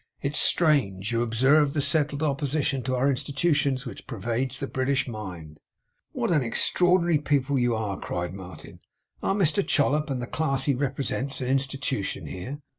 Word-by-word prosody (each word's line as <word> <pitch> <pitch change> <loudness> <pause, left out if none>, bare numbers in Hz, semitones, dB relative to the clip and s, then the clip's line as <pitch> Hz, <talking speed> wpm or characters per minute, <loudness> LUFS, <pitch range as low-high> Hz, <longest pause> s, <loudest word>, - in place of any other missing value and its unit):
'It's 140 +1 -1
strange! 115 - +2
You 115 0 +1
observe 135 +6 +3
the - - +1
settled 150 -1 +1
opposition 140 -2 0
to 130 +2 -1
our 130 +2 +2
Institutions 140 0 0
which 115 -6 -9
pervades 120 +3 -2
the - - -2
British 135 +1 0
mind!' 90 -9 -8 0.5
'What - - -1
an 155 -4 +3
extraordinary 175 +7 +2
people 140 -2 +1
you 120 -1 +2
are!' 105 -3 -3
cried 90 0 -4
Martin. 95 -2 -10 0.4
'Are 195 - 0
Mr 195 0 +2
Chollop 150 0 +2
and 135 -2 -2
the 125 - -3
class 135 0 -1
he 140 - +2
represents, 135 0 -2
an 130 -2 -3
Institution 135 -5 -1
here? 130 +11 -6
135 Hz, 160 wpm, -26 LUFS, 120-145 Hz, 0.5 s, observe